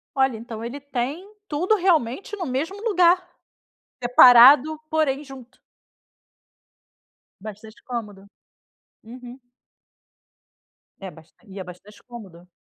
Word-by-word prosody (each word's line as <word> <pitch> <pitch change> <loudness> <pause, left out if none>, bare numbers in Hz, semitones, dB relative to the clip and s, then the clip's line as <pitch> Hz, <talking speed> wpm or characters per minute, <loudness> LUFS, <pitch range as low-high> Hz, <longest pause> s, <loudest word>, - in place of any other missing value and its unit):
Olha, 265 -4 0
então 225 0 -9
ele 250 +5 -7
tem 280 +6 -5 0.2
tudo, 355 +8 0
realmente, 350 - -1
no 360 -4 -6
mesmo 320 +11 -4
lugar. 365 -4 +2 0.8
Separado, 250 +5 +6
porém 300 -3 -1
junto. 260 -2 -14 1.8
Bastante 215 +1 -12
cômodo. 210 -5 -8 0.8
Uhum. 245 +2 -12 1.6
É 195 -1 -8
bas 160 0 -18 0.2
e 195 - -9
é - - -6
bastante 200 +4 -16
cômodo. 185 -7 -13
250 Hz, 100 wpm, -22 LUFS, 220-310 Hz, 1.8 s, Separado